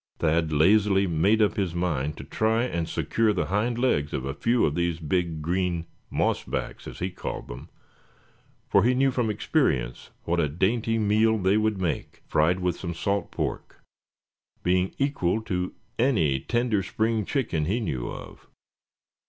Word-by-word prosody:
Thad 80 0 +1
lazily 95 +5 +4
made 95 +6 +3
up 105 - +1
his 95 -4 -1
mind 75 -5 -1
to - - -7
try 110 +2 +1
and 85 -9 -2
secure 110 -2 +1
the 95 - 0
hind 115 +3 +1
legs 95 - +1
of 65 - -2
a 70 - -3
few 120 +9 +2
of 75 - 0
these 85 0 0
big 80 -1 -1
green 90 0 -1 0.3
"mossbacks," - - -2
as - - -8
he 90 +2 -3
called - - -6
them; - - -9 1.0
for - - +4
he 125 +2 +3
knew 135 +1 +3
from 120 -3 0
experience 60 - 0
what 85 +1 0
a 75 -3 +2
dainty 110 +8 +1
meal 110 +1 +3
they 95 0 +2
would 110 -2 +1
make, 90 -3 -3
fried 90 +4 +2
with 90 -1 -1
some 85 -2 -4
salt 100 +2 -1
pork, - - -4 0.8
being 90 +1 +1
equal 125 -9 +1
to 90 -4 -3 0.2
any 85 - +2
tender 120 - 0
spring 110 +3 0
chicken 95 - -1
he 100 +9 0
knew 70 - -3
of. - - -10
95 Hz, 160 wpm, -26 LUFS, 85-110 Hz, 1.0 s, lazily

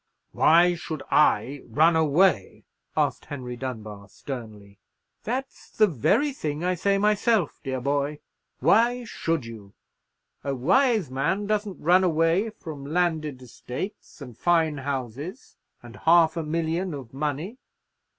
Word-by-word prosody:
"Why 175 +2 +5
should 160 -3 -6
I 140 -1 +3
run 155 +8 +3
away?" 160 - +2 0.3
asked - - 0
Henry 125 -4 -6
Dunbar, 110 -5 -7
sternly. 105 -6 -9 0.5
"That's 255 +4 -4
the 215 - +4
very 205 - +1
thing 155 - -4
I 180 +1 +1
say 195 +3 +1
myself, 210 - +1
dear 130 -1 -3
boy. 140 +3 -1 0.4
Why 240 +2 +3
should 165 - -2
you? 105 -4 -11 0.7
A 140 -1 -2
wise 200 - +2
man 150 +10 -1
doesn't 210 -2 -2
run 180 +4 +4
away 165 +4 +2
from 155 -9 -9
landed 155 -4 -1
estates, 125 - -8
and 125 -4 -9
fine 165 0 +2
houses, 140 - -5 0.3
and 120 -1 -12
half 165 -1 +4
a 165 - -1
million 165 +2 -2
of 130 -4 -10
money. 150 - -3
155 Hz, 130 wpm, -25 LUFS, 130-185 Hz, 0.7 s, Why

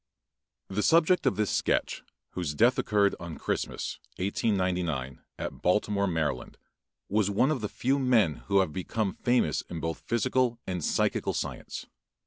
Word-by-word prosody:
] - - -59 0.3
The 100 +2 -1
subject 165 - +4
of 130 - +2
this 105 -2 0
sketch, - - 0 0.3
whose 85 -5 -3
death 120 - +4
occurred 100 -1 +2
on 85 -2 -7
Christmas, - - -3 0.2
1899, 90 - -1 0.2
at - - -5
Baltimore, 100 +2 +2
Md., 80 -7 -2 0.5
was 105 0 +1
one 115 +8 +3
of 135 -6 -1
the 105 - -2
few 135 +3 0
men 115 - +3
who 100 -1 +4
have 80 -5 -2
become 100 +3 -2
famous 120 - +1
both 80 -1 -3
in - - -36
physical 120 +1 +1
and 90 -3 -3
psychical - - 0
science. - - -4
100 Hz, 150 wpm, -28 LUFS, 85-120 Hz, 0.5 s, subject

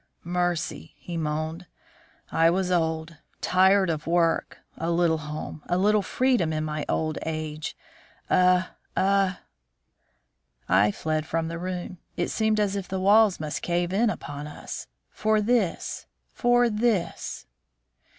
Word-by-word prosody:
"Mercy!" 175 - -2
he 175 - -7
moaned. 160 +2 -3 0.6
"I 165 0 +4
was 185 +1 0
old 160 -1 0 0.2
tired 190 +1 +4
of 155 -1 -4
work 170 -1 +1 0.2
a 165 - -3
little 170 -1 +2
home 150 0 -6
a 175 - +1
little 210 +2 +3
freedom 245 -5 +1
in 155 0 -1
my 155 -1 -3
old 155 -1 0
age 155 -1 -4 0.5
a 180 0 +4 0.3
a 195 -1 +2 0.6
" - - -45
I 105 +1 +4
fled 155 +5 -2
from 165 0 -1
the 170 0 -5
room. 180 0 -5 0.2
It 175 - 0
seemed 220 -1 +1
as 205 -1 +1
if 195 -2 -4
the 190 - -3
walls 205 +1 +5
must 155 -1 -3
cave 175 +1 -1
in 225 +3 +3
upon 145 -7 -5
us. 150 - -7 0.2
For 215 0 +1
this, 210 -4 0 0.3
for 245 0 +3
this! 215 - -1
175 Hz, 140 wpm, -26 LUFS, 155-195 Hz, 0.6 s, walls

